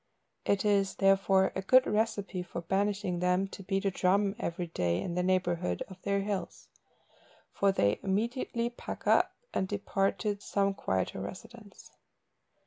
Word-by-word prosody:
It 200 +1 +1
is, 200 -2 +2
therefore, 195 -1 +3
a 190 - -1
good 255 +7 +5
recipe 210 -3 -1
for 175 -1 -6
banishing 195 0 0
them 180 +2 +2
to - - -9
beat 195 +1 -2
a 195 - +2
drum 195 +2 +2
every 175 -4 -3
day 90 - -1
in 170 - -3
the 180 - 0
neighbourhood 175 - 0
of 190 -1 -12
their 200 0 0
hills, 200 -1 -4 0.8
for 200 0 +3
they 100 - +1
immediately 235 +4 -1
pack 240 - -8
up, - - +3 0.2
and 190 - 0
depart 195 -1 0
to 205 -2 -1
some 200 -1 0
quieter 95 - -2
residence. 215 - -10
195 Hz, 150 wpm, -30 LUFS, 180-205 Hz, 0.8 s, good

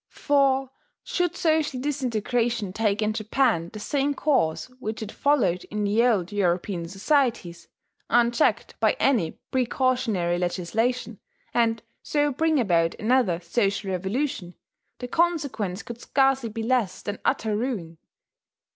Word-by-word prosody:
For 270 -2 +1 0.3
should 355 -1 -1
social 315 -6 +1
disintegration 240 -6 -1
take 215 0 0
in 215 0 0
Japan 215 -6 +1
the 215 - -8
same 285 +5 0
course 260 - +1
which 220 -2 -4
it 215 - -7
followed 265 -12 +1
in 210 0 -3
the 210 +3 +2
old 210 -7 +2
European 180 -2 -1
societies, 195 - 0 0.4
unchecked 240 +4 +2
by - - +3
any 230 -12 +1
precautionary 245 -8 +1
legislation, 215 +6 -1 0.3
and 230 -1 +1 0.2
so 295 -1 +1
bring 315 +2 +1
about 170 -7 +2
another 220 -7 +2
social 195 +2 -1
revolution, 190 0 -2 0.4
the 245 - -6
consequence 265 - 0
could 235 0 -9
scarcely 270 -3 +2
be 225 +1 -5
less 230 -6 0
than 205 0 -4
utter 220 -2 0
ruin. 205 -9 -3
230 Hz, 125 wpm, -25 LUFS, 195-265 Hz, 0.4 s, by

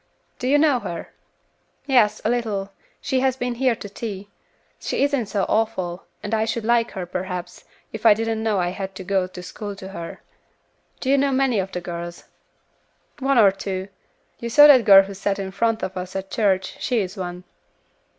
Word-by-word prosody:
"Do 250 - -2
you 285 +3 +4
know 290 -4 +3
her?" 170 -7 -6 0.8
"Yes, 225 -6 +3
a - - +3
little; 210 -5 -2 0.3
she 265 -2 0
has 260 0 +1
been 245 -1 -2
here 250 0 +1
to 205 - -8
tea. 205 -1 -7 0.5
She - - -1
isn't 280 -6 +1
so 200 -1 0
awful, 195 -5 -1 0.2
and 205 - -4
I 220 0 +2
should 225 0 -2
like 235 0 +3
her, 185 -2 -4
perhaps, 180 0 -5 0.3
if 220 - -6
I 220 -3 +7
didn't 225 0 -2
know 220 -2 +1
I 175 -1 +1
had 190 +1 -6
to 190 - -7
go 190 0 0
to 180 -1 -10
school 205 +2 -7
to 190 -1 -9
her." 170 -3 -7 0.8
"Do 265 - 0
you 280 - +4
know 280 0 +2
many 260 -4 +2
of 190 0 -3
the 180 - -4
girls?" 170 0 -6 1.0
"One 275 0 +1
or 205 -4 +7
two. 190 0 -5 0.5
You 235 - -4
saw 290 +5 +8
that 270 -5 +7
girl 195 -2 +9
who 200 +1 -8
sat 195 +1 -1
in 195 -1 -4
front 225 +3 0
of 190 - -3
us 180 0 -6
at 190 0 -5
church, 190 -4 0
she 250 - 0
is 190 +1 -5
one." 180 -2 -6
205 Hz, 200 wpm, -23 LUFS, 190-235 Hz, 1.0 s, girl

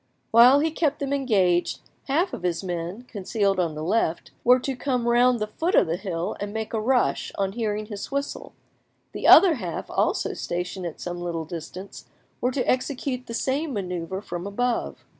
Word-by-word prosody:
Whilst 250 +6 +7
he 320 - 0
kept 300 -2 0
them 280 0 -2
engaged, 195 -10 +2 0.3
half 335 +7 +1
of - - -5
his 175 0 -1
men, 175 +4 -4
concealed 200 -3 -1
on 165 -4 0
the 155 - -5
left, 175 -2 0
were 250 +1 +6
to 265 +1 -3
come 250 -2 -1
round 245 +1 +4
the 215 - -1
foot 330 - -1
of - - +6
the 165 0 -1
hill 180 -3 -3
and 205 0 -4
make 220 +1 -4
a 220 - 0
rush 250 +2 +1
on 195 -1 0
hearing 215 -1 -2
his 205 -2 -7
whistle; 280 0 -4 0.6
the - - -2
other 360 0 +9
half, 180 -7 -5
also - - 0
stationed 180 +1 -4
at 165 - -8
some, 175 0 -5
little 170 -2 -3
distance, 175 +4 -8 0.4
were 250 - +2
to 255 -1 -2
execute 255 0 -1
the 230 - -5
same 280 +4 -1
manoeuvre 185 -1 -4
from 175 0 -5
above. 245 +4 -2
215 Hz, 185 wpm, -25 LUFS, 180-255 Hz, 0.6 s, other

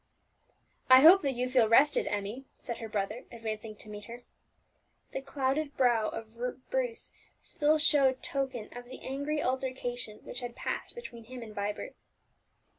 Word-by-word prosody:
"I 260 0 +10
hope 355 +6 +9
that 275 -3 -1
you 250 +1 0
feel 250 -4 +4
rested, 285 +6 +5
Emmie," 210 +6 -3
said 235 - -6
her 225 - -6
brother, 210 +3 -2
advancing 220 -2 -5
to 215 - -6
meet 210 0 -8
her. 240 +2 -9 0.9
The 270 - -3
clouded 275 +2 -1
brow 240 -4 +3
of 225 0 -8 0.4
Bruce - - -1 0.3
still 300 +1 +2
showed 280 -4 +3
token 265 -6 -3
of 245 0 -7
the 255 +2 -10
angry 285 +3 -2
altercation 250 -4 -2
which 245 - -6
had 245 -1 -6
passed - - -4
between 235 - -9
him 250 +1 -8
and 215 -2 -10
Vibert. 205 - -3
250 Hz, 155 wpm, -31 LUFS, 225-275 Hz, 0.9 s, I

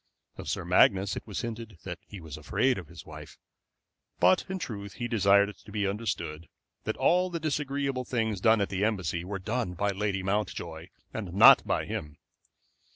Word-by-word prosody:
Of - - -7
Sir - - -2
Magnus 95 +1 +4
it - - -7
was 100 -6 -4
hinted 115 -4 -6
that - - -6
he 100 - -9
was 80 -4 -8
afraid 105 - +1
of 85 - -10
his 85 +1 -12
wife; - - -11 0.8
but 185 - +4
in 190 - -2
truth 100 - -6
he 120 - -4
desired 100 -3 +4
it 105 - -11
to 105 - -14
be 105 -1 -1
understood 85 -6 -3 0.4
that - - -2
all 180 +1 +3
the 170 -1 -3
disagreeable 140 -3 -1
things 110 -5 -1
done 110 0 +5
at 100 - 0
the 95 0 -1
Embassy 95 -6 -1
were 95 +2 -4
done 105 -1 -2
by 100 +4 0
Lady 100 -1 -2
Mountjoy, 90 -5 -3 0.3
and 95 -5 -5
not - - +8
by - - 0
him. 75 -1 -5
100 Hz, 185 wpm, -29 LUFS, 95-115 Hz, 0.8 s, not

